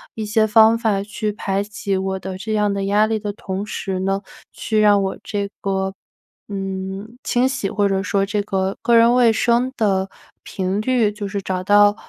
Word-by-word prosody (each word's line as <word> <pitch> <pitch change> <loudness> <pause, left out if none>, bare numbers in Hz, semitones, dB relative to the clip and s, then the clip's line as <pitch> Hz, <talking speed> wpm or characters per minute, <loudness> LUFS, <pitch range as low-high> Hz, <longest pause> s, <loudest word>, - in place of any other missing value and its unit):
一 220 - -4
些 215 +1 +2
方 220 +1 +5
法 215 -4 0
去 210 +1 -3
排 195 -1 -2
解 205 -1 -3
我 190 0 -2
的 190 0 -6
这 215 +3 -4
样 210 -1 +1
的 200 0 -2
压 205 +2 +3
力 220 0 0
的 205 -1 -3
同 195 -1 -5
时 195 -3 -4
呢， 195 +1 0 0.3
去 215 -1 -1
让 205 -1 +5
我 190 0 -2
这 200 -1 -3
个 190 -1 -1 0.6
嗯， 195 +3 -5
清 245 +1 +2
洗 210 -6 -2
或 205 0 +1
者 195 -1 0
说 200 -1 +1
这 205 +1 -1
个 195 -1 -1
个 235 - +3
人 230 +1 +6
卫 245 -2 +5
生 235 +3 +1
的 195 -3 +1 0.3
频 190 +1 -2
率 240 -2 +2
就 205 -1 -6
是 200 0 -3
找 185 -1 -3
到， 205 +1 +5
205 Hz, 210 characters per minute, -20 LUFS, 195-215 Hz, 0.6 s, 人